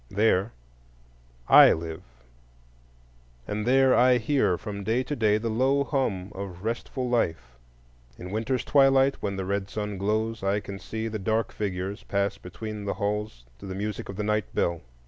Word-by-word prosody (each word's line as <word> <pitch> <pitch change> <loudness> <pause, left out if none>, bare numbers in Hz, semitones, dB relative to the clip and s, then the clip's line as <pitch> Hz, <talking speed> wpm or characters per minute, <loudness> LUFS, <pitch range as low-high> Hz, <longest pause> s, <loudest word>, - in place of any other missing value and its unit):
There 105 0 +2 1.0
I - - +9
live, 80 0 -5 1.5
and 105 +2 -3
there 130 +1 +5
I 125 0 +5
hear 110 -6 +1
from 100 -1 -6
day 115 +5 +1
to 145 - -4
day 105 -4 +3
the 110 +2 -3
low 135 +5 +2
hum 115 -9 -2
of 95 -2 -7
restful 125 +3 -3
life. 80 - -1 0.6
In 90 +1 -8
winter's 115 +4 -1
twilight, 135 -1 +4
when 100 -1 -2
the 95 -1 -3
red 100 0 -2
sun 105 -2 -4
glows, 110 +3 -1
I 100 +1 +1
can 100 -1 -8
see 110 +2 -4
the 110 -1 -4
dark 110 +3 0
figures 95 -1 -4
pass 100 0 -1
between 105 +3 -7
the 100 - -2
halls 105 - -3
to 100 - -9
the 95 - -5
music 105 +2 -4
of 100 - -6
the 105 - -3
night 105 -1 0
bell. 85 -1 0
105 Hz, 165 wpm, -26 LUFS, 100-115 Hz, 1.5 s, I